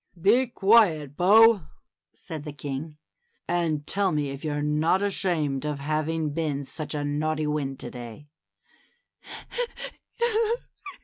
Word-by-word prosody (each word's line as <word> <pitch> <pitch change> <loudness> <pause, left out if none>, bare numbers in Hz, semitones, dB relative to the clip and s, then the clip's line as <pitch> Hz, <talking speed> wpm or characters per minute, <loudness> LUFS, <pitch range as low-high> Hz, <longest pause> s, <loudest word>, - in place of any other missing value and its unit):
Be 235 +9 +4
quiet. 195 - +3
Bo! 205 -1 +6 0.2
" - - -65
said 155 -3 -7
the 150 - -6
king, 145 +1 -6 0.5
and 165 -4 0
tell 195 +3 +1
me 145 -2 -1
if 140 0 -8
you're 145 -1 -2
not 155 +6 +2
ashamed 165 -9 0
of 150 -1 -2
having 155 +2 -1
been 150 -2 -2
such 150 +2 -5
a 145 - -2
naughty 155 +1 -1
wind 145 -3 -2
to - - -6
day?" 120 +3 -9
155 Hz, 125 wpm, -26 LUFS, 145-175 Hz, 0.5 s, Bo